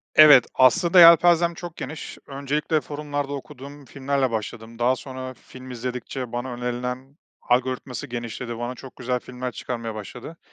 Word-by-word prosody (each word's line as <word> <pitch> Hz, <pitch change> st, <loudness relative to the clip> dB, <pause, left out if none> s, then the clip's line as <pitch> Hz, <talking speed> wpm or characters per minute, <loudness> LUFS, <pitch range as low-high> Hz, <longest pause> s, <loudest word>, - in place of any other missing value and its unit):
Evet, 145 Hz, -5 st, +9 dB
aslında 170 Hz, +8 st, +5 dB
yelpazem 170 Hz, 0 st, +7 dB
çok 170 Hz, 0 st, -9 dB
geniş. 155 Hz, 0 st, -7 dB
Öncelikle 145 Hz, +3 st, -1 dB
forumlarda 145 Hz, -1 st, -4 dB
okuduğum 140 Hz, 0 st, -9 dB
filmlerle 135 Hz, -1 st, -1 dB
başladım. 110 Hz, +1 st, -6 dB
Daha 125 Hz, +2 st, +3 dB
sonra 130 Hz, 0 st, -7 dB
film 130 Hz, 0 st, -13 dB
izledikçe 125 Hz, 0 st, -5 dB
bana 120 Hz, +1 st, -4 dB
önerilen 125 Hz, +3 st, -5 dB, 0.2 s
algoritması 130 Hz, +2 st, -1 dB
genişledi, 120 Hz, -1 st, -5 dB
bana 120 Hz, +2 st, -4 dB
çok 130 Hz, +1 st, -12 dB
güzel 125 Hz, 0 st, -2 dB
filmler 125 Hz, +1 st, -6 dB
çıkarmaya 115 Hz, 0 st, -5 dB
başladı. 110 Hz, +9 st, -9 dB
130 Hz, 135 wpm, -24 LUFS, 125-145 Hz, 0.2 s, Evet